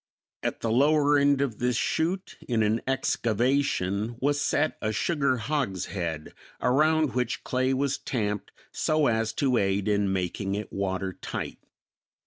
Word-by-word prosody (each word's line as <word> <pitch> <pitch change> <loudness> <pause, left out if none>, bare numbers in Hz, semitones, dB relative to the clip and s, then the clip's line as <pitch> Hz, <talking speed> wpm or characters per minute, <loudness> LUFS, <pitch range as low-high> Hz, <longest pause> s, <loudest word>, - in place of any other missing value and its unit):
At - - -3
the 115 - 0
lower 145 +4 +4
end 140 -1 +3
of 125 -6 -2
this 125 0 +1
chute 180 +8 -1
in 115 -2 +2
an 110 +2 +1
excavation 120 -4 0
was 145 +2 +1
set 155 +1 +1
a 110 - 0
sugar 140 +3 +1
hogshead, 95 - -3 0.3
around 155 +1 +3
which 125 -1 -1
clay 130 +1 0
was 135 +1 0
tamped 105 -5 -2 0.2
so 155 -1 +1
as 115 -2 +1
to 130 -4 +1
aid 95 0 0
in 100 -2 +2
making 95 +1 -2
it 105 +1 -5
watertight. 95 -1 -3
120 Hz, 135 wpm, -27 LUFS, 105-140 Hz, 0.3 s, lower